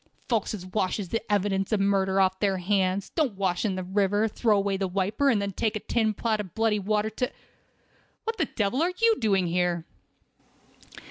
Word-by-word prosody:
Folks 225 -3 0
as 185 -3 -8
washes 185 0 -2
the 225 - -1
evidence 195 -1 +1
of 215 - +2
murder 195 -1 +2
off 190 0 +2
their 195 -2 +1
hands, 190 +1 0
don't 285 - 0
wash 185 -2 0
in 205 -4 0
the 185 - -3
river, 205 +3 +1
throw 215 0 +2
away 200 0 0
the 195 0 -1
wiper, 200 +9 +1
and 230 -6 +3
then 200 0 -2
take 215 +3 -1
a - - -1
tin 220 -1 0
pot 220 +1 0
of 190 -5 -6
bloody 225 -2 +2
water 210 +2 0
to—" 250 +4 -2 0.9
"What 450 0 -3
the 320 - +1
devil 230 +3 -1
are 355 +2 +1
you 460 -1 +4
doing 195 -4 +2
here?" 175 -1 0
200 Hz, 195 wpm, -27 LUFS, 190-220 Hz, 0.9 s, you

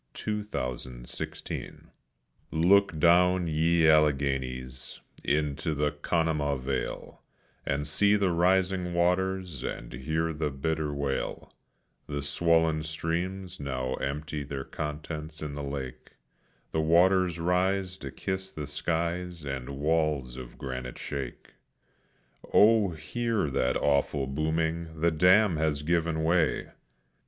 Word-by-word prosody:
THE 105 -1 -2
JOHNSTOWN 65 - -5
DISASTER, - - -4 1.2
1889 80 +3 +1
Look 100 -5 +5
down, 90 +3 +5
ye 80 +1 +3
Alleghenies, 65 -4 +1 0.2
into 75 +2 0
the 75 +1 +1
Conemaugh 75 -2 0
vale, 65 0 -4 0.5
And 70 +1 0
see 100 +7 +3
the 100 -3 +2
rising 90 +1 +2
waters, 90 -3 0
and - - -5
hear 80 +6 -1
the 75 -1 -1
bitter 75 +2 -2
wail; 70 -1 -3 0.5
The 70 -1 -3
swollen 80 +1 +2
streams 85 +4 -3
now 65 -2 -2
empty 75 +2 -3
their 70 -1 -5
contents 75 +1 -5
in 75 -1 -4
the 75 - -5
lake, 70 -2 -6 0.6
The 80 - +1
waters 90 +2 +4
rise 95 +2 +1
to - - -7
kiss 95 0 -4
the 75 - -5
skies 85 +3 -2
and 65 -2 -4
walls 75 -4 0
of 65 -2 -9
granite 65 -2 -5
shake. 70 -4 -6 1.0
Oh, 110 -1 +6
hear 110 - -2
that 65 -1 +1
awful 70 -1 +1
booming; 80 +3 -1
the 85 +2 +3
dam 90 +3 +5
has 75 -2 0
given 85 0 +1
way! 85 -1 +1
80 Hz, 120 wpm, -28 LUFS, 70-90 Hz, 1.2 s, Oh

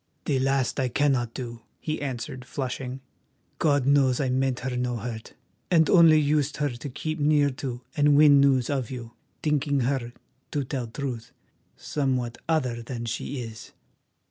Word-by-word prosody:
"The 140 -3 +1
last 135 -1 +1
I 130 - +1
cannot 125 -3 +1
do," 120 -3 -6 0.2
he 155 -1 -3
answered, 130 -2 -4
flushing. 130 0 -5 0.6
"God 145 -4 +2
knows 135 -2 +4
I 135 -3 0
meant 130 0 0
her 130 0 -3
no 125 0 -1
hurt, 115 0 -7 0.3
and 160 -3 +4
only 165 -4 +7
used 150 -1 +1
her 145 -1 0
to 120 +4 -7
keep 155 +5 -4
near 145 -1 +3
to 125 -3 -4
and 145 -1 +4
win 145 -2 +7
news 135 -3 +3
of 130 -5 -1
you, 120 -3 -7 0.3
thinking 145 -2 +1
her, 125 -1 -1 0.4
to 145 -2 0
tell 130 -2 -4
truth, 120 -2 -5 0.5
somewhat 130 -5 -2
other 130 -7 0
than 120 0 -5
she 125 +3 -4
is." 115 0 -10
135 Hz, 160 wpm, -26 LUFS, 125-145 Hz, 0.6 s, only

